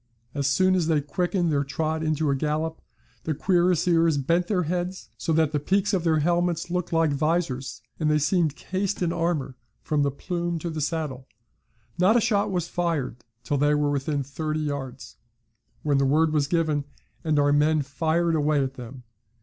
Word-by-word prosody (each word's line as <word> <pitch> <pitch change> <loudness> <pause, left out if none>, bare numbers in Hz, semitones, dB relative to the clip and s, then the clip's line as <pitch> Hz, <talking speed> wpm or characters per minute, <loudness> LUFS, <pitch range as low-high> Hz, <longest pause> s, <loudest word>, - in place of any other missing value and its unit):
As 140 -2 -1
soon 185 +7 +3
as 180 -4 +1
they 160 -2 +3
quickened 175 +3 -1
their 140 -1 +1
trot 155 +3 -2
into 155 -2 0
a - - +1
gallop, 155 +3 -2 0.4
the 155 - -2
cuirassiers 170 -2 +2
bent 170 +6 +1
their 185 -3 +1
heads 180 +3 -3
so - - -3
that 160 -2 +2
the 150 - 0
peaks 195 +7 +1
of 185 -3 +1
their 160 -2 +2
helmets 175 +1 0
looked 180 -1 -2
like 165 -2 +2
vizors, 140 -5 -1 0.2
and 155 -2 +1
they 150 - +3
seemed 155 0 +1
cased 190 +1 -2
in 170 -1 0
armour 155 -6 -1 0.3
from 150 -1 0
the 140 - +2
plume 170 +4 -3
to 165 +1 -4
the 155 -1 -4
saddle. 145 -4 -3 0.7
Not 200 +6 +5
a - - +5
shot 205 -2 +1
was 175 -3 -1
fired 165 -10 -2 0.3
till 145 +3 -1
they 145 +1 +3
were 145 -1 +1
within 140 0 -1
thirty 155 +3 -3
yards, 135 -4 -5 0.7
when 145 -2 +2
the 135 - +3
word 155 +3 +3
was 145 -2 +2
given, 155 -3 0 0.4
and 155 -2 +1
our 145 0 +3
men 150 +1 +3
fired 160 +4 0
away 150 -2 +2
at 135 0 -3
them. 125 0 -10
155 Hz, 185 wpm, -25 LUFS, 145-175 Hz, 0.7 s, Not